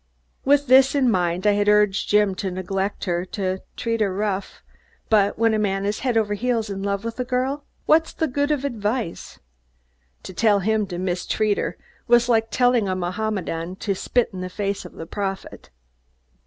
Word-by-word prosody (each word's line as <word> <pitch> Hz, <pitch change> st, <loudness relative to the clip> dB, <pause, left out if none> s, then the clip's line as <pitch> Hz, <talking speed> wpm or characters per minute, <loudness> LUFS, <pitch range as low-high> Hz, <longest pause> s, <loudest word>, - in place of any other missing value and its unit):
With 285 Hz, +1 st, +4 dB
this 265 Hz, +1 st, +5 dB
in 260 Hz, -4 st, +3 dB
mind, 180 Hz, 0 st, 0 dB
I 210 Hz, -, +6 dB
had 205 Hz, 0 st, +2 dB
urged 210 Hz, -1 st, +3 dB
Jim 210 Hz, -2 st, +3 dB
to 190 Hz, +1 st, -3 dB
neglect 190 Hz, +2 st, -3 dB
her, 175 Hz, -1 st, 0 dB
to 190 Hz, -1 st, -3 dB, 0.2 s
"treat 230 Hz, -1 st, -1 dB
her 200 Hz, -2 st, +2 dB
rough," 200 Hz, 0 st, -3 dB, 0.5 s
but 205 Hz, -2 st, +3 dB
when 225 Hz, 0 st, +3 dB
a 215 Hz, -, +1 dB
man 195 Hz, -1 st, 0 dB
is 205 Hz, +1 st, -1 dB
head 250 Hz, -3 st, 0 dB
over 210 Hz, -2 st, +1 dB
heels 225 Hz, -1 st, -1 dB
in 195 Hz, 0 st, -4 dB
love 200 Hz, +1 st, -2 dB
with 230 Hz, +2 st, -5 dB
a -, -, +1 dB
girl, 260 Hz, +3 st, -2 dB, 0.2 s
what's 320 Hz, +1 st, +3 dB
the 320 Hz, -, -1 dB
good 285 Hz, +2 st, -1 dB
of 290 Hz, -2 st, 0 dB
advice? 220 Hz, -6 st, -3 dB, 0.9 s
To 185 Hz, -, -8 dB
tell 210 Hz, +1 st, +3 dB
him 210 Hz, +1 st, 0 dB
to 175 Hz, -2 st, -5 dB
mistreat 185 Hz, +4 st, 0 dB
her -, -, -3 dB, 0.3 s
was 240 Hz, 0 st, +5 dB
like 225 Hz, -2 st, +2 dB
telling 245 Hz, -4 st, +2 dB
a 185 Hz, -, 0 dB
Mohammedan 185 Hz, -2 st, -3 dB
to 200 Hz, +1 st, -2 dB
spit 240 Hz, +6 st, 0 dB
in 185 Hz, -, -6 dB
the 185 Hz, -, -4 dB
face 200 Hz, 0 st, -3 dB
of 180 Hz, -, -10 dB
the 165 Hz, -, -8 dB
prophet. 195 Hz, +2 st, -5 dB
210 Hz, 190 wpm, -23 LUFS, 190-235 Hz, 0.9 s, I